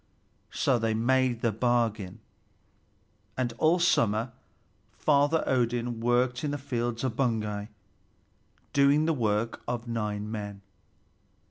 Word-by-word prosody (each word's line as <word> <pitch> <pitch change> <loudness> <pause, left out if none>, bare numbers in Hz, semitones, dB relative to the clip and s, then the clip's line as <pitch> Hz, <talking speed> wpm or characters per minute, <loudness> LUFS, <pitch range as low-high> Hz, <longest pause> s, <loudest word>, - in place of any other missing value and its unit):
So 130 -3 +1
they 110 -1 0
made 125 +1 +1
the 115 - +2
bargain, 110 -4 0 1.2
and 125 -2 -1
all 160 +3 +4
summer 120 - +2 0.6
Father 145 +2 +2
Odin 120 -2 0
worked 125 +2 +1
in 150 - 0
the 145 - -2
fields 120 -4 -3
of 130 -4 -1
Baugi, 105 -5 -1 1.1
doing 140 +2 +4
the 165 - +2
work 115 -3 -1
of 120 0 -3
nine 105 -2 -3
men. 100 -2 -6
120 Hz, 115 wpm, -28 LUFS, 110-130 Hz, 1.2 s, all